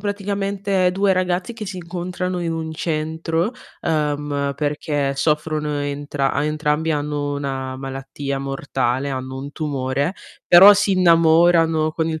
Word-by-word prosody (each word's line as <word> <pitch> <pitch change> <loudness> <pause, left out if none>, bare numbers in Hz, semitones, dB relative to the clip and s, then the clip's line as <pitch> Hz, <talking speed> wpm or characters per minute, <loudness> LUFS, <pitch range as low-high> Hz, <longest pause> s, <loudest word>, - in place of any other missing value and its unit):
praticamente 200 -2 -1
2 195 +1 +2
ragazzi 185 +3 -1
che 225 -2 -7
si 190 -1 -6
incontrano 180 +1 -4
in 170 -1 -2
un 160 -1 -4
centro, 160 +4 -2 0.3
uhm, 145 -2 -1
perché 145 -1 -1
soffrono 150 +1 -1
entra 145 -1 -2
a 145 +2 0
entrambi 150 +1 0
hanno 145 -1 -2
una 135 -2 -4
malattia 135 +1 -5
mortale, 135 -1 -2
hanno 130 0 -5
un 140 +2 -7
tumore, 140 +1 -2 0.3
però 190 +4 +9
si 205 0 +1
innamorano 165 -2 +4
con 160 0 -1
il 160 -1 -3
155 Hz, 135 wpm, -21 LUFS, 145-175 Hz, 0.3 s, però